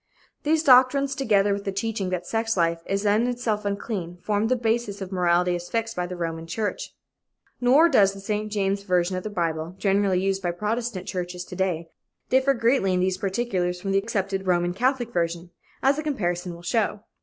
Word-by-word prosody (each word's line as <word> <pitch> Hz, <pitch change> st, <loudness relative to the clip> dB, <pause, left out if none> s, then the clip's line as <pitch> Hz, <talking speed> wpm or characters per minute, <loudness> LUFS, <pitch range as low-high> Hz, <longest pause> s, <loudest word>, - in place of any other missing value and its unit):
These 315 Hz, +1 st, +1 dB
doctrines, 275 Hz, 0 st, +5 dB
together 205 Hz, -7 st, +2 dB
with 200 Hz, 0 st, -4 dB
the 195 Hz, -, -2 dB
teaching 200 Hz, -1 st, -2 dB
that 180 Hz, -1 st, -3 dB
sex 225 Hz, +1 st, -1 dB
life 165 Hz, -1 st, +1 dB
is 195 Hz, +1 st, -1 dB
of 210 Hz, +2 st, +3 dB
itself 235 Hz, -4 st, -2 dB
unclean, 200 Hz, -4 st, -3 dB
formed 210 Hz, +1 st, 0 dB
the 255 Hz, -, +3 dB
basis 225 Hz, -3 st, -1 dB
of 190 Hz, -1 st, -6 dB
morality 180 Hz, -1 st, +2 dB
as 175 Hz, 0 st, -5 dB
fixed 230 Hz, 0 st, -2 dB
by 180 Hz, 0 st, -2 dB
the 180 Hz, -, -6 dB
Roman 165 Hz, -1 st, -4 dB
church. 210 Hz, +5 st, -3 dB, 0.6 s
Nor 265 Hz, +7 st, +6 dB
does 200 Hz, -, +4 dB
the 195 Hz, -, -10 dB
St. 210 Hz, +1 st, -3 dB
James 200 Hz, -1 st, 0 dB
version 180 Hz, -2 st, +1 dB
of 185 Hz, -, -2 dB
the 215 Hz, -, -5 dB
Bible, 165 Hz, -3 st, -2 dB
generally 195 Hz, -2 st, +2 dB
used 195 Hz, +1 st, 0 dB
by 175 Hz, -, -1 dB
Protestant 210 Hz, +2 st, -3 dB
churches 180 Hz, -2 st, -4 dB
to -, -, -9 dB
day, 175 Hz, -3 st, -1 dB, 0.4 s
differ 265 Hz, +1 st, +4 dB
greatly 230 Hz, -5 st, +2 dB
in -, -, +1 dB
these 185 Hz, 0 st, 0 dB
particulars 190 Hz, -4 st, -1 dB
from 195 Hz, +2 st, -3 dB
the 195 Hz, -, +3 dB
accepted 195 Hz, -2 st, -2 dB
Roman 175 Hz, -1 st, +2 dB
Catholic 245 Hz, +3 st, 0 dB
version, 170 Hz, 0 st, -2 dB, 0.3 s
as 275 Hz, +2 st, +3 dB
a -, -, -3 dB
comparison 175 Hz, -, -2 dB
will 170 Hz, -, -13 dB
show. 210 Hz, +1 st, 0 dB
195 Hz, 195 wpm, -25 LUFS, 180-225 Hz, 0.6 s, Nor